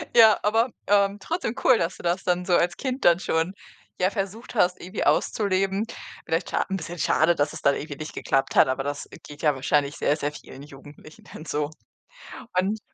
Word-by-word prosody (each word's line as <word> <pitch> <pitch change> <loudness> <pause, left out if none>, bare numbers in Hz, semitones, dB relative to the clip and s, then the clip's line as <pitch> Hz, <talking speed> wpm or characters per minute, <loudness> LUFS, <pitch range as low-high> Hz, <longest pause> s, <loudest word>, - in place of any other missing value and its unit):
Ja, 225 -2 +7
aber, 225 +4 +2 0.2
ähm, 200 0 +3
trotzdem 320 - -3
cool, 255 - +6
dass 170 -1 -2
du - - -13
das 175 +2 0
dann 180 0 0
so 180 - 0
als 175 0 +1
Kind 260 -1 -3
dann 170 0 +6
schon, 165 0 -1 0.5
ja, 185 - +4
versucht 205 +4 -5
hast, 180 -4 +2
irgendwie 185 +4 -4
auszuleben. 195 0 +1 0.4
Vielleicht 165 +2 -1
scha - - 0
'n 190 - -1
bisschen 175 0 -7
schade, 165 +3 +3
dass 145 -1 0
es - - -8
dann 140 - +3
irgendwie 145 -1 -6
nicht 155 +1 -7
geklappt 135 0 -1
hat, - - +6
aber 130 +1 -1
das, 145 +1 -4
äh, - - -13
geht 145 0 -11
ja 150 -3 +3
wahrscheinlich 140 +2 0
sehr, 145 - +1
sehr 145 -1 -2
vielen 140 -2 -12
Jugendlichen 145 +2 -14
dann 155 - -9
so. 150 -1 -2 0.9
Und 200 +4 0
175 Hz, 205 wpm, -25 LUFS, 150-200 Hz, 0.9 s, Ja